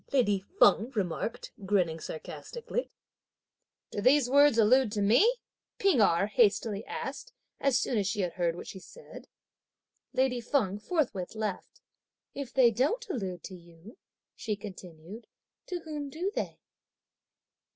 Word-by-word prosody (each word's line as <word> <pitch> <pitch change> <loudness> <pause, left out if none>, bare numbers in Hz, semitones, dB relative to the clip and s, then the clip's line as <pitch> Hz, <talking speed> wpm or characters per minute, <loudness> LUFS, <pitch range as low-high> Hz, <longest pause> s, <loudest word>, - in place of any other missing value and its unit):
lady 230 -8 +3 0.2
Feng 225 +4 +5
remarked 200 +2 -3
grinning 180 -5 +1
sarcastically. 475 - -6 1.0
"Do 205 - -3
these 260 +3 +4
words 285 -3 +6
allude 230 +1 +4
to 210 - -1
me?" 430 - +4 0.3
P'ing 385 - +3
Erh 195 -2 +4
hastily 210 0 +2
asked, - - -6 0.3
as 275 -3 +2
soon 235 - 0
as 200 - 0
she 205 0 -1
had 180 -2 -2
heard 170 -2 0
what - - -8
she 190 - -8
said. - - -13 0.8
Lady 255 -2 +1
Feng 220 -6 0
forthwith 225 - -2
laughed. 215 -3 -5 0.5
"If 275 -3 -6
they 250 -3 +5
don't 300 - 0
allude 185 - -4
to 190 - -8
you," 170 +5 -16 0.4
she 215 -2 -3
continued, 190 0 -10 0.4
"to 360 -2 -4
whom 300 -3 -5
do 350 +7 -3
they?" - - -3
220 Hz, 135 wpm, -29 LUFS, 195-275 Hz, 1.0 s, words